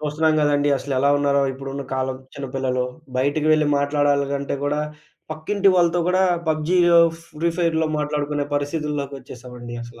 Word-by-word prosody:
చూస్తున్నాం 155 +1 +1
గదండీ, 145 -1 +2
అసలెలా 140 0 0
ఉన్నారో 140 -1 +2
ఇప్పుడున్న 135 +1 -6
కాలం 130 0 -2 0.2
చిన్నపిల్లలు, 130 -2 -2 0.3
బయటికి 145 +4 0
వెళ్లి 155 -1 +3
మాట్లాడాలంటే 140 -1 0
గూడా, 145 +1 0 0.5
పక్కింటి 195 +6 +1
వాళ్ళతో 175 0 +3
గూడా 185 +1 +3 0.3
పబ్‌జీయో, 170 +2 +3 0.4
ఫ్రీఫైర్‌లో 165 -1 +1
మాట్లాడుకునే 150 -1 -1
పరిస్థితుల్లోకొచ్చేసామండి 140 -5 -5
అసల. 120 0 -12
145 Hz, 115 wpm, -22 LUFS, 135-155 Hz, 0.5 s, వెళ్లి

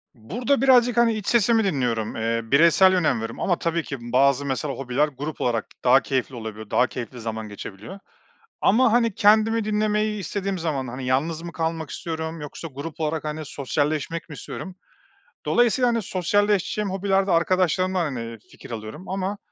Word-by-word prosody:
Burada 230 - -1
birazcık, 245 -3 +5
hani, 235 -1 +4
iç 210 -2 -5
sesimi 230 -1 +3
dinliyorum. 125 - -1
Eee, 115 +1 -1
bireysel 170 +9 +5
önem 180 -4 +2
veriyorum 115 0 -5
ama 175 -3 0
tabii 170 0 -1
ki 135 - -5
bazı 135 +3 +2
mesela 140 +1 -2
hobiler 135 +3 0
grup 145 +2 -6
olarak 115 -3 0 0.2
daha 130 +2 +6
keyifli 130 -1 -2
olabiliyor. 110 -2 -7
Daha 125 - +3
keyifli 125 0 -7
zaman 110 -1 -4
geçebiliyor 105 - -9 0.6
ama, 235 +1 +4
hani, 230 -3 +2
kendimi 220 +2 +4
dinlemeyi 210 0 0
istediğim 195 +1 -3
zaman, 145 -6 -2
hani, 125 +1 -6
yalnız 155 +6 0
mı 170 -1 -7
kalmak 160 -2 -3
istiyorum 160 -1 -5
yoksa 150 +3 -7
grup 155 +3 -7
olarak, 155 0 -1
hani, 155 +1 -4
sosyalleşmek 150 +3 -2
mi 150 - -8
istiyorum. 185 +6 -7 0.7
Dolayısıyla, 240 +1 +3
hani, 230 -1 +1
sosyalleşeceğim 205 +2 0
hobilerde 195 0 +1
arkadaşlarımdan, 185 +1 +2
hani, 115 -5 -5
fikir - - -13
alıyorum 110 - -7
ama 195 +1 -2
165 Hz, 160 wpm, -24 LUFS, 130-200 Hz, 0.7 s, daha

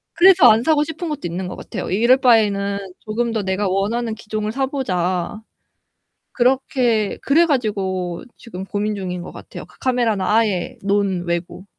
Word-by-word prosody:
그래서 360 -6 +7
안 220 +2 +4
사고 300 +1 +3
싶은 320 +2 -5
것도 300 - -4
있는 175 +2 -4
것 - - -6
같아요. - - -6
'이럴 235 +7 +4
바에는 200 -5 +2 0.2
조금 230 +2 -2
더 220 -2 -2
내가 190 +1 -1
원하는 220 +4 -1
기종을 215 -1 -4
사보자.' 205 -9 -2 0.9
그렇게 245 -4 +1
그래 325 +5 +4
가지고 195 - -2
지금 190 -6 -8
고민중인 195 -3 -3
것 - - -9
같아요. - - -10
그 - - -22
카메라는 235 -6 0
아예 210 -3 +1
논외고. 185 -3 -1
215 Hz, 320 characters per minute, -20 LUFS, 190-245 Hz, 0.9 s, 그래서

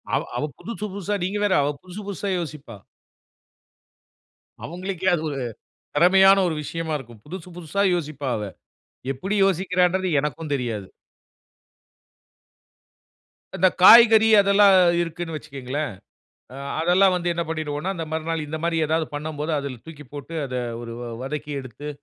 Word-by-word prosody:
அவ - - +1 0.2
அவ - - -2
புதுசு 230 -2 -6
புதுசா, 200 +1 -3
நீங்க 195 +3 -2
வேற, 200 - +2
அவ 140 - 0
புதுசு 185 +3 -9
புதுசா 200 0 -4
யோசிப்பா. 150 -8 -7 1.9
அவங்களுக்கே, 185 +2 -4
அது 160 - -4
ஒரு 140 - -4 0.6
திறமையான 190 +5 +6
ஒரு 160 - -2
விஷயமா 165 +1 -4
இருக்கும். 120 -4 -13
புதுசு 180 +2 -8
புதுசா 175 +3 -2
யோசிப்பா 150 -5 -4
அவ. 105 - -4 0.7
எப்பிடி 195 +11 -3
யோசிக்கிறான்றது 185 0 +1
எனக்கும் 150 +1 -4
தெரியாது. 115 -7 -3 2.7
இந்த 185 - +4
காய்கறி, 225 +1 +8
அதெல்லாம் 200 0 +5 0.3
இருக்குன்னு 165 -1 -4
வச்சுக்கங்களேன். 140 -1 -5 0.6
அ - - -9 0.2
அதெல்லாம் 180 +3 +4
வந்து 175 -1 -1
என்ன 170 0 -1
பண்ணிடுவோன்னா, 155 +2 -3
இந்த 165 -2 -4
மறுநாள் 160 0 -2
இந்த 155 +2 -4
மாரி 170 -1 0
ஏதாவது 160 0 +1
பண்ணம்போது, 150 +1 -4
அதுல 140 -4 -6
தூக்கி 150 -3 -11
போட்டு, 145 +3 -8
அத 130 -1 -6 0.3
ஒரு 115 -1 -7
வ - - -5 0.2
வதக்கி 150 +2 -5
எடுத்து 135 +3 -8
165 Hz, 135 wpm, -23 LUFS, 145-185 Hz, 2.7 s, காய்கறி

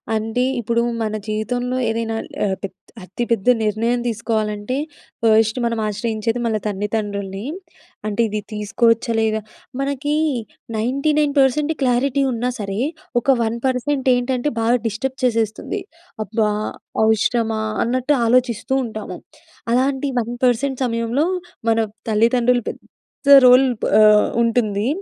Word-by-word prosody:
అంటె 225 +3 -1 0.2
ఇప్పుడు 235 +1 0 0.2
మన 215 -1 -1
జీవితంలో 245 +4 -2
ఏదైనా 225 0 -2 0.3
ఆహ్, 195 -2 +1
పెద్ 195 - -5 0.3
అతిపెద్ద 230 +2 -1
నిర్ణయం 225 +3 0
తీసుకోవాలంటే 220 0 -2 0.5
ఫర్స్ట్ 220 +1 +4
మనం 230 -1 -1
ఆశ్రయించేది 220 +2 -2
మన 225 - 0
తల్లిదండ్రుల్ని. 205 -1 -3 0.6
అంటే 210 +2 0
ఇది 210 0 -3
తీసుకోవచ్చా? 230 +3 +1
లేదా? 220 -1 +1 0.4
మనకి 280 +2 -1 0.6
99% 285 +3 +2
క్లారిటీ 265 +2 +2
ఉన్నా 240 +1 -1
సరే 200 +1 -3 0.4
ఒక - - -16 0.2
1% 260 +4 -1
ఏంటంటే 250 +2 0
బాగా 230 +2 +3
డిస్టర్బ్ 255 +5 -3
చేసేస్తుంది. 230 - -1 0.4
"అబ్బా! 215 0 0 0.5
అవసరమా?" 220 0 +1 0.2
అన్నట్టు 255 +4 +1
ఆలోచిస్తు 245 +1 +1
ఉంటాము. 220 -2 -6 0.6
అలాంటి 265 +2 +1
1% 245 +3 0
సమయంలో 230 +4 0 0.4
మన 225 - +3 0.3
తల్లిదండ్రులు 240 +2 +3
పెద్ద - - -9 0.6
రోల్ 255 +2 +7 0.3
ఆహ్, 210 0 +6 0.2
ఉంటుంది 220 -2 +1
230 Hz, 105 wpm, -20 LUFS, 215-250 Hz, 0.6 s, రోల్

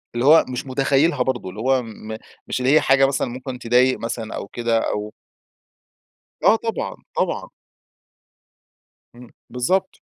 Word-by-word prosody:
اللي 120 +2 0
هو 160 +3 +7
مش 125 +1 -4
متخيلها 135 +2 +2
برضه، 125 -7 -2
اللي 95 +3 -10
هو 130 +1 +2
م 110 -1 -8 0.3
مش - - -2
اللي 130 +2 +2
هي 155 - +6
حاجة 135 0 +4
مثلًا 135 -1 -1
ممكن 125 +1 -7
تضايق 125 +2 +3
مثلًا 115 -1 -4
أو - - -6
كده 115 +1 0
أو 105 0 -4 1.3
آه - - +7
طبعًا، 225 -3 -3 0.2
طبعًا. - - -1 1.7
امم 120 -1 -13 0.2
بالضبط. 185 +10 -1
125 Hz, 140 wpm, -21 LUFS, 115-135 Hz, 1.7 s, هو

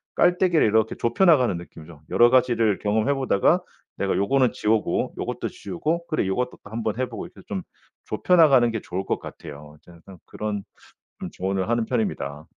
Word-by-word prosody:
깔때기를 175 -3 +3
이렇게 110 +1 +2
좁혀나가는 130 - +3
느낌이죠. 80 -3 -12
여러 120 0 +6
가지를 120 -5 +3
경험해 110 +6 +1
보다가 130 -7 +2 0.4
내가 - - 0
'요거는 130 +5 +2
지우고 110 0 0
요것도 - - -3
지우고 170 0 -3
그래 155 - -1
요것도 125 +6 -1
또 100 - -12
한번 110 -1 -3
해보고.' 130 - -4
이렇게 - - -16
좀 - - -3 0.4
좁혀나가는 135 -2 +4
게 115 -2 -4
좋을 95 +2 -5
것 - - -1
같아요. 75 +1 -11
전 85 - -16
항상 95 -2 -13
그런 105 -2 -4 0.6
좀 - - -5
조언을 95 +2 -2
하는 120 -1 +1
편입니다. 80 - -3
115 Hz, 395 characters per minute, -24 LUFS, 95-135 Hz, 0.6 s, 여러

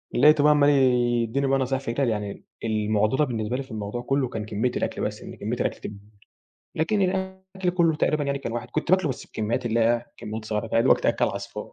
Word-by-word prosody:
لقيته 145 +2 +6
بقى 150 - +6
عمّال 145 -1 +5
يديني 125 -1 +2
بقى 135 0 +2
نصايح 130 +1 -1
في - - -16
إيه - - -6
تاني، 130 -5 +2
يعني 105 -2 -4 0.2
المعضلة 110 +4 +1
بالنسبة 120 -1 -2
لي 135 - -3
في 130 - -16
الموضوع 110 +2 -4
كله 135 +1 0
كان 110 -3 -4
كمية 110 +4 -1
الأكل - - -2
بس - - -3
إن - - -9
كمية - - -3
الأكل - - -1
تكبر. 105 -1 -8 0.8
لكن 195 +6 +1
الأكل 190 0 -2
كله 170 -3 +2
تقريبًا 150 -1 +1
يعني 140 0 -1
كان 115 -4 -5
واحد، 120 0 -4
كنت 155 +2 -2
باكله 185 -4 +4
بس 130 - -5
بكميات 110 +2 -2
اللي 115 0 +1
هي 115 +1 +4
إيه، 120 0 -5
كميات 110 +1 -6
صغيرة 105 +1 -2
فاهم. - - -1
يا - - +5
دوبك 130 - +4
تأكل - - +2
عصفور. - - -5
125 Hz, 230 wpm, -25 LUFS, 110-150 Hz, 0.8 s, لقيته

